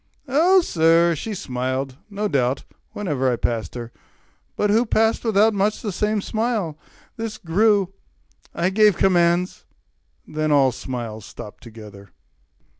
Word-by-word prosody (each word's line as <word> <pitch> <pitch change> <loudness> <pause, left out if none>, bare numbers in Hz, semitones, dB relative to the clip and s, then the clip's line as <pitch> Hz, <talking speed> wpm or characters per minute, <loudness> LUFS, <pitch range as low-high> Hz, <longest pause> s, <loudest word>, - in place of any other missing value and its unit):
Oh 340 +8 +4
sir, 170 - +3
she 210 +7 -5
smiled, 130 -5 -3
no 210 +1 -2
doubt, 130 -6 0 0.3
Whene'er 140 -10 0
I - - +1
passed 115 0 -3
her; 120 -1 -6 0.6
but 210 -1 +1
who 225 +3 +4
passed 220 -1 +1
without 220 -1 +3
Much 205 +1 0
the 210 - -2
same 210 +2 0
smile? 220 -8 -1 0.4
This 225 -1 -4
grew; 200 +1 +2 0.6
I 180 +2 0
gave 210 -1 +4
commands; 175 -1 +2 0.6
Then 155 0 -1
all 135 -3 +4
smiles 115 -4 -6
stopped 105 - -10
together. 105 -4 -12
175 Hz, 130 wpm, -22 LUFS, 130-215 Hz, 0.6 s, Oh